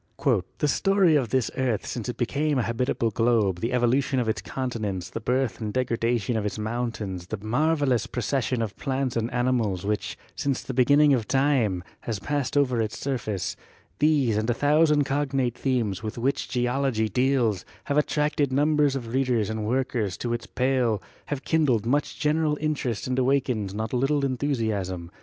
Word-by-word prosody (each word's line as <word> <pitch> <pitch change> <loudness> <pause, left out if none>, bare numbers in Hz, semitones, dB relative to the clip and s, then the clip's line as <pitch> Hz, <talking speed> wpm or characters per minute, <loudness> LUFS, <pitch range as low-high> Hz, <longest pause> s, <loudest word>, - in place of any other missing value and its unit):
"The 150 - +1
story 195 +1 +3
of 130 -6 +1
this 130 -1 +1
earth 125 -5 0
since 120 -1 -4
it 125 - -4
became 145 +4 0
a 125 - +2
habitable 115 -1 0
globe, 110 -5 +2
the 115 +6 -2
evolution 130 +3 +2
of 120 - -1
its 110 - -1
continents, 110 -8 -4
the - - -4
birth 125 +2 -1
and 105 -1 -2
degrada 120 -1 0
tion 115 +3 -2
of 110 - -1
its 105 - -3
mountains, 110 -5 -3
the 110 - -4
marvelous 130 +3 +1
procession 125 0 -1
of 110 -2 -5
plants 135 -2 -2
and 115 0 -1
animals 120 -7 0
which, 105 0 -2 0.2
since 140 -2 -1
the 130 - -5
beginning 145 +3 +5
of 115 -5 0
time, 130 -10 +2 0.2
has 115 -3 -3
passed 145 +6 -2
over 125 -5 +2
its 110 -1 -3
surface 110 -8 -3 0.2
— - - -34
these 140 -7 +3
and 110 +2 -1
a 120 - +2
thousand 150 +2 +4
cognate 135 -3 0
themes 115 -8 -1
with 110 +1 -5
which 130 +4 -1
Geology 125 -2 0
deals, 120 -4 +1 0.2
have 145 +1 +1
attracted 150 -2 0
numbers 145 0 +3
of 120 -3 -5
readers 125 -5 +1
and 110 -1 -3
workers 120 -5 -1
to 120 -1 -2
its 120 - -4
pale, 125 -4 +1 0.3
have 145 -2 -3
kindled 140 -9 +2
much 140 +5 0
general 150 0 +1
interest 145 -7 -2
and 130 0 -1
awakened 125 -7 0
not 110 +3 -3
a - - +2
little 140 +2 +1
enthusiasm. 110 -10 -2
125 Hz, 175 wpm, -26 LUFS, 110-140 Hz, 0.3 s, beginning